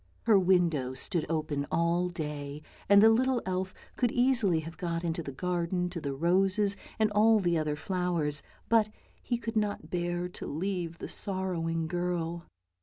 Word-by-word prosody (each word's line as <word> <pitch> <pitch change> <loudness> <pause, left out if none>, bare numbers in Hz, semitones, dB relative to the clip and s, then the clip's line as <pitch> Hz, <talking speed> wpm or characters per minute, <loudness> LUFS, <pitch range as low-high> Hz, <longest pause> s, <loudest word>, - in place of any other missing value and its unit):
Her 215 -4 +5
window 170 -8 +2
stood 155 +4 -2
open 155 -3 -1
all 170 +2 +1
day, 150 -3 -5 0.3
and 200 +1 +8
the 220 - +8
little 255 +2 +2
elf 185 0 -2 0.3
could 245 -2 +2
easily 245 -10 +3
have 165 +1 -8
got 170 -1 -2
into 170 0 -1
the 140 - -6
garden 180 +3 -1
to 170 -2 -5
the 140 -2 -3
roses 190 +6 +2 0.2
and 215 -1 +2
all 215 +1 +5
the 175 -3 +1
other 155 -2 0
flowers, 170 -4 0 0.3
but 225 -2 +4 0.3
he 240 - -1
could 230 -1 -5
not 210 -1 -1
bear 175 0 -1
to - - -8
leave 175 +1 -3
the - - -6
sorrowing 175 -4 -2
girl. 175 -1 -2
175 Hz, 165 wpm, -30 LUFS, 165-195 Hz, 0.3 s, and